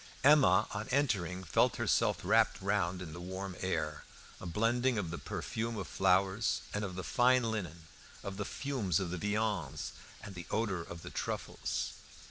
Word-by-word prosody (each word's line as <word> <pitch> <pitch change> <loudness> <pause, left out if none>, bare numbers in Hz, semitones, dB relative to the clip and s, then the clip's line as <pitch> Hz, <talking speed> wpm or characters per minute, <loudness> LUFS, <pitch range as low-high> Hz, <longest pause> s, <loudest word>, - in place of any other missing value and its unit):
Emma, 135 -10 +6
on 105 +1 -4
entering, 95 - +1
felt 85 - +3
herself - - +2
wrapped - - +4
round 95 -2 0
by 90 - -6
the 80 +1 -8
warm 95 +1 -5
air, 95 0 -2 0.4
a - - -7
blending 115 +7 +2
of 90 -6 -2
the 85 - -4
perfume 115 0 -3
of 95 - -4
flowers 95 +3 +2
and 105 - -1
of 95 -3 -4
the 95 - -4
fine 125 +2 +4
linen, 95 -8 -3 0.4
of 100 -1 -5
the 105 - -1
fumes 115 - -1
of 90 -3 -3
the 90 - -2
viands, 105 +1 -1 0.3
and 100 - -7
the 90 -2 -8
odour 105 -5 0
of 85 0 -9
the - - -7
truffles. - - -3
100 Hz, 170 wpm, -33 LUFS, 90-110 Hz, 0.4 s, Emma